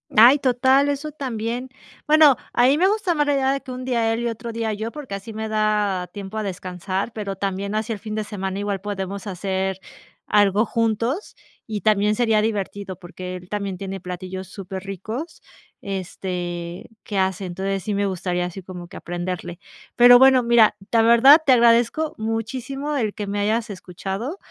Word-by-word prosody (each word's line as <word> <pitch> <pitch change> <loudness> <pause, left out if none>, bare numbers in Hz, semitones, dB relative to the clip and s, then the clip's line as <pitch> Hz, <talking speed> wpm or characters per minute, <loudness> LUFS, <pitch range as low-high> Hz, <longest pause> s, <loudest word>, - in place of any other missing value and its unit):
Ay, 240 +6 +8
total, 265 +2 +3
eso 285 +2 -3
también. 245 -2 -4 0.4
Bueno, 305 -3 +7 0.2
a 245 - +4
mí 280 - +4
me 370 +4 +4
gusta 405 -4 +1
más 295 -1 +2
la 290 - +2
idea 270 -1 +2
de 275 - -3
que 255 - -9
un 255 0 -6
día 230 -3 +1
él, 225 - -2
y 240 - -1
otro 235 +1 -5
día 225 -1 -2
yo, 220 +2 -4
porque 290 -9 -7
así 210 +3 -8
me 220 0 -4
da 210 -4 0
tiempo 200 +1 -7
a 215 - -1
descansar, 185 +2 -4
pero 200 -3 -4
también, 195 +1 -3
así 220 +1 -1
el 205 - -7
fin 215 +1 -6
de 215 - -1
semana 195 -2 -4
igual 200 -2 -2
podemos 200 -1 -5
hacer 190 0 -2 0.5
algo 205 +1 +3
juntos, 230 - -1 0.3
y 215 -2 -4
también 210 -1 +3
sería 220 -2 +2
divertido 200 -3 -3
porque 180 0 -7
él, 180 +1 -14
también 200 -2 -3
tiene 195 0 -5
platillos 185 +1 -6
superricos, 195 - -7 0.4
este, 180 -2 -5
que 205 - -4
hace, 190 0 0
entonces, 195 +2 -3
sí 210 - -2
me 200 0 +1
gustaría 180 -1 -1
así 180 +2 -7
como 180 -1 -9
que - - -11
aprenderle. 175 0 -5 0.4
Pero 245 0 +8
bueno, 265 -2 +6
mira, 235 -3 +5 0.2
la 230 - +4
verdad 235 +7 +7
te 265 - +6
agradezco 240 +6 +3
muchísimo 250 +6 -3
el 215 -5 -1
que 210 - -5
me 205 +1 -2
hayas 220 +2 0
escuchado. 195 - -5
210 Hz, 180 wpm, -22 LUFS, 190-240 Hz, 0.5 s, Ay